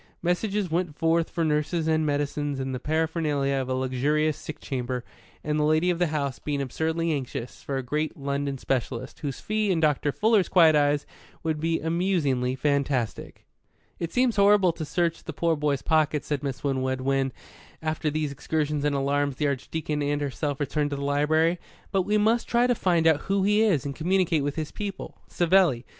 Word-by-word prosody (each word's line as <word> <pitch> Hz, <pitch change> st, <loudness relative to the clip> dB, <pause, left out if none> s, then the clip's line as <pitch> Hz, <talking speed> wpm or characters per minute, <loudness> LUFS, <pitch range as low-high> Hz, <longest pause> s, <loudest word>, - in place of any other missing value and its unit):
Messages 190 Hz, +1 st, 0 dB
went 170 Hz, -2 st, -1 dB
forth 165 Hz, 0 st, +2 dB
for 165 Hz, -2 st, -1 dB
nurses 155 Hz, +2 st, 0 dB
and 160 Hz, 0 st, +2 dB
medicines 145 Hz, -1 st, -1 dB
and 130 Hz, 0 st, -3 dB
the 125 Hz, -, -3 dB
paraphernalia 155 Hz, -2 st, 0 dB
of 130 Hz, -1 st, -2 dB
a 130 Hz, -, 0 dB
luxurious 140 Hz, +4 st, +1 dB
sick 155 Hz, 0 st, -8 dB
chamber, 125 Hz, -2 st, -4 dB, 0.4 s
and 150 Hz, 0 st, 0 dB
the -, -, +2 dB
lady 155 Hz, +4 st, +3 dB
of 175 Hz, -, -3 dB
the 175 Hz, -, +3 dB
house 140 Hz, -4 st, -2 dB
being 145 Hz, -1 st, -2 dB
absurdly 160 Hz, +5 st, -1 dB
anxious 130 Hz, -4 st, -4 dB
for 140 Hz, -, -3 dB
a 135 Hz, -, -3 dB
great 150 Hz, +6 st, -2 dB
London 140 Hz, 0 st, -2 dB
specialist, 130 Hz, -1 st, -3 dB
whose 140 Hz, -4 st, -4 dB
fee, 215 Hz, -1 st, -1 dB
in 180 Hz, -3 st, +2 dB
Dr. 150 Hz, -2 st, +2 dB
Fuller's 215 Hz, +2 st, +2 dB
quiet 165 Hz, -4 st, +6 dB
eyes, 145 Hz, 0 st, +2 dB, 0.4 s
would 160 Hz, -2 st, -1 dB
be 165 Hz, +1 st, 0 dB
amusingly 160 Hz, -7 st, 0 dB
fantastic. 140 Hz, -4 st, -1 dB, 0.5 s
"It 170 Hz, -1 st, -3 dB
seems 250 Hz, -3 st, +2 dB
horrible 200 Hz, -2 st, +5 dB
to 165 Hz, -1 st, -6 dB
search 170 Hz, +1 st, -1 dB
the 160 Hz, -, -6 dB
poor 165 Hz, +2 st, +1 dB
boy's 145 Hz, -2 st, -1 dB
pockets," 155 Hz, -2 st, +1 dB
said 145 Hz, -3 st, -2 dB
Miss 135 Hz, -2 st, -4 dB
Winwood, 130 Hz, -2 st, -1 dB
when, 135 Hz, 0 st, +1 dB, 0.5 s
after 155 Hz, 0 st, -1 dB
these 150 Hz, -1 st, -2 dB
excursions 150 Hz, +1 st, -2 dB
and 145 Hz, -1 st, +1 dB
alarms 140 Hz, 0 st, 0 dB
the 150 Hz, -, -1 dB
Archdeacon 150 Hz, +2 st, -2 dB
and 145 Hz, 0 st, 0 dB
herself 145 Hz, 0 st, -2 dB
had -, -, -8 dB
returned 150 Hz, 0 st, 0 dB
to 145 Hz, -, -3 dB
the 140 Hz, -, -5 dB
library; 155 Hz, +4 st, +2 dB, 0.3 s
"but 190 Hz, -3 st, +1 dB
we 210 Hz, +1 st, +3 dB
must 220 Hz, +3 st, +2 dB
try 240 Hz, +1 st, +3 dB
to 250 Hz, -, +3 dB
find 175 Hz, -7 st, +1 dB
out 160 Hz, -2 st, +4 dB
who 195 Hz, 0 st, +2 dB
he 210 Hz, +2 st, +3 dB
is 185 Hz, -11 st, +2 dB
and 140 Hz, -1 st, -4 dB
communicate 180 Hz, -1 st, +1 dB
with 145 Hz, 0 st, -2 dB
his 155 Hz, -2 st, -4 dB
people. 200 Hz, -2 st, -6 dB
Savelli. 175 Hz, -8 st, +3 dB
150 Hz, 190 wpm, -26 LUFS, 140-170 Hz, 0.5 s, quiet